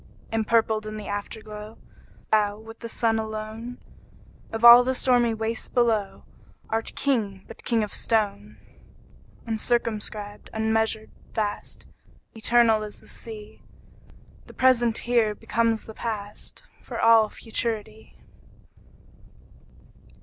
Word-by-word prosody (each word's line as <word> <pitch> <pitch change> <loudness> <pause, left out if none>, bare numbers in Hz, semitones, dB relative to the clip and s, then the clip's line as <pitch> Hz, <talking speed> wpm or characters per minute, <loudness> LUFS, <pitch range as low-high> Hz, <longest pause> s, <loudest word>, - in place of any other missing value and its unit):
Empurpled 220 -1 +1
in 215 0 -5
the 210 - -7
Afterglow, 210 +1 -6 0.5
Thou, 210 -1 +3
with 225 +1 -12
the 230 - -7
Sun 225 -1 +1
alone, 220 +2 -5 0.7
Of 225 +1 0
all 240 +1 +11
the 260 +1 0
stormy 245 -3 +3
waste 225 +2 -4
below, 225 -5 +1 0.5
Art 225 0 -2
King, 210 -9 0
but 230 - -12
king 230 -2 +1
of 210 - -5
stone! 210 -2 -1 0.9
Uncircumscribed, 215 -2 -2
unmeasured, 220 0 0 0.2
vast, 210 -2 -3 0.5
Eternal 225 -1 +4
as 210 -1 -7
the - - -17
Sea, 215 -2 -9 0.9
The - - -14
present 240 -3 +3
here 230 -3 +2
becomes 230 0 0
the 220 - -9
past, 210 -2 -6 0.2
For - - -7
all 225 -2 +6
futurity. 220 -1 -4
220 Hz, 110 wpm, -25 LUFS, 215-230 Hz, 0.9 s, all